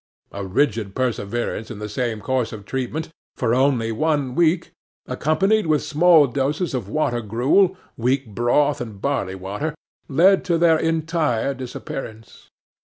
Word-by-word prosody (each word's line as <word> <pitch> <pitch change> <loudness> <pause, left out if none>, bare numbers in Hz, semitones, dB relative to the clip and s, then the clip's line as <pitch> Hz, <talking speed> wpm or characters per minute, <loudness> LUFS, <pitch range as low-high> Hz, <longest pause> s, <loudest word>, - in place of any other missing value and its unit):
A 100 - -5
rigid 100 0 0
perseverance 120 -2 -2
in 115 - -7
the 105 +1 -5
same 115 -1 -3
course 130 -2 -1
of 105 -3 -9
treatment 135 +7 -3 0.3
for 120 -2 0
only 125 -3 +2
one 145 +1 0
week, 170 +3 +2 0.3
accompanied 190 +7 +1
with 155 -2 +2
small 160 0 +5
doses 140 +6 -1
of 120 -7 -3
water 120 -3 0
gruel, 135 - +2 0.2
weak 130 +3 +1
broth, 120 +7 +1
and 110 -5 -7
barley 100 -8 -1
water, 100 +12 -4 0.3
led 180 +7 +4
to 170 -3 +2
their 165 -1 +4
entire 160 -6 0
disappearance. 120 -3 -8
130 Hz, 140 wpm, -22 LUFS, 115-155 Hz, 0.3 s, small